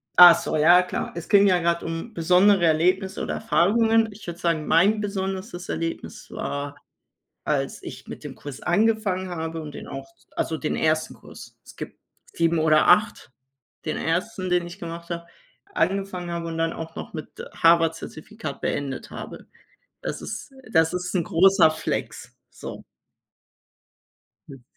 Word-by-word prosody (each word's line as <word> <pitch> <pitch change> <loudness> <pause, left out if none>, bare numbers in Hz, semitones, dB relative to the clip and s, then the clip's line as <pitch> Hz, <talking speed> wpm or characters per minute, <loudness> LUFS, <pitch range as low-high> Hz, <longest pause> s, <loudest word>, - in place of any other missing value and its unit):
ach 175 -1 +10
so, - - -3
ja 170 +4 +6
klar. - - -4
Es 170 - -6
ging 200 0 +6
ja 180 -2 +4
gerade 170 0 0
um 165 +7 -5
besondere 180 +2 +4
Erlebnisse 185 +4 +2
oder 75 -1 -2
Erfahrungen. 225 - +3
Ich 205 +1 -13
würde 170 +1 -6
sagen, 165 -3 0
mein 210 +5 +4
besonderestes 190 -1 -4
Erlebnis 165 0 -5
war, 140 0 -4 0.7
als - - -1
ich - - -9
mit - - -9
dem - - -7
Kurs 145 -2 -9
angefangen 195 -1 +1
habe 165 -1 -4
und 150 -1 -7
den - - -9
auch 135 0 -7 0.3
also 160 - -1
den 150 - -2
1. 155 0 0
Kurs. - - -13
Es - - -15
gibt - - -8 0.3
7 165 0 +1
oder 155 -1 +4
8, 205 - +3 0.5
den 155 - -2
1., 185 +3 -2
den 175 -1 +2
ich 175 +3 -10
gemacht 170 0 -8
habe 170 0 -4 0.5
angefangen 195 - -1
habe 170 -1 -3
und 165 - -5
dann 165 0 0
auch 165 0 -8
noch - - -7
mit 155 -2 -6 0.3
Harvard-Zertifikat 165 0 0
beendet 140 -2 -3
habe. - - -8 0.6
Das - - -4
ist - - -7 0.2
das 160 -1 +3
ist 180 +1 -3
'n 170 - +2
großer 180 -1 +5
Flex, 160 - -4 0.2
so. - - -9 1.7
Hm. 135 -3 -12
170 Hz, 155 wpm, -24 LUFS, 160-190 Hz, 1.7 s, ach